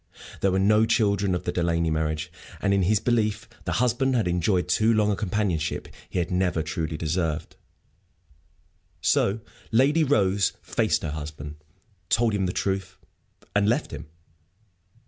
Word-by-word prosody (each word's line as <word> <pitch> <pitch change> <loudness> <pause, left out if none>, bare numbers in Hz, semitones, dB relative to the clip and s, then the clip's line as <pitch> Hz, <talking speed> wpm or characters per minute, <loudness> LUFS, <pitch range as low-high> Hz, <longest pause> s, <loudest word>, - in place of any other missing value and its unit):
There 95 - +2
were 95 - +1
no 105 +3 +4
children 100 -5 +2
of 90 - -4
the - - -1
Delaney 85 -2 0
marriage; 80 +1 -2 0.3
and 100 +4 +1
in 100 - +3
his 100 +3 +3
belief 110 -2 0 0.2
the - - -1
husband 125 +2 +1
had 115 -6 +1
enjoyed 90 +1 +1
too 110 +5 +3
long 105 -2 +3
a - - +1
companionship 95 -6 -1 0.2
he - - -4
had 85 0 -1
never 90 -3 +1
truly 80 0 -3
deserved. 80 -1 -2 1.4
So 105 +3 +2 0.3
Lady 140 +8 +4
Rose 100 -8 +2
faced - - 0
her 80 - -2
husband, 75 0 -7 0.5
told 115 -1 +2
him 95 -2 0
the - - -1
truth, 95 0 -2 0.6
and 100 +1 +3
left 125 +6 0
him. 75 +1 -7
95 Hz, 150 wpm, -25 LUFS, 85-110 Hz, 1.4 s, no